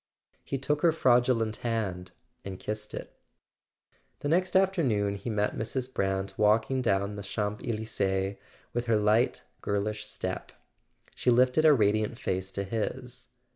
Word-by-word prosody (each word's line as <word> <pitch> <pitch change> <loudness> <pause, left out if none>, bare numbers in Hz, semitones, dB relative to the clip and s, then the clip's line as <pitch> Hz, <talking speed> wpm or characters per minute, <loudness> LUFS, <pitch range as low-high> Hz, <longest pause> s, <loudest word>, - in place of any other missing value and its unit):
He 135 - -3
took 145 +2 -1
her 170 - +5
fraudulent 120 -6 +2
hand 100 -6 -2 0.3
and 95 -2 -6
kissed 105 0 -5
it. - - -9 1.0
The 145 - -1
next 180 +3 +1
afternoon 145 - +2
he 100 +4 -5
met 105 -1 0
Mrs. 125 +3 -3
Brant 95 0 -1
walking 110 +5 +3
down 100 -3 0
the - - -5
Champs 105 +1 -3
Elysees 100 -4 -1 0.4
with 120 0 -2
her 115 -2 +4
light 105 +3 +2 0.2
girlish 105 +1 -1
step. - - -5 0.6
She - - 0
lifted 125 +5 +4
a 155 - +8
radiant 110 0 +1
face 95 -2 -2
to 100 - -2
his. 125 +5 -4
110 Hz, 140 wpm, -29 LUFS, 100-125 Hz, 1.0 s, a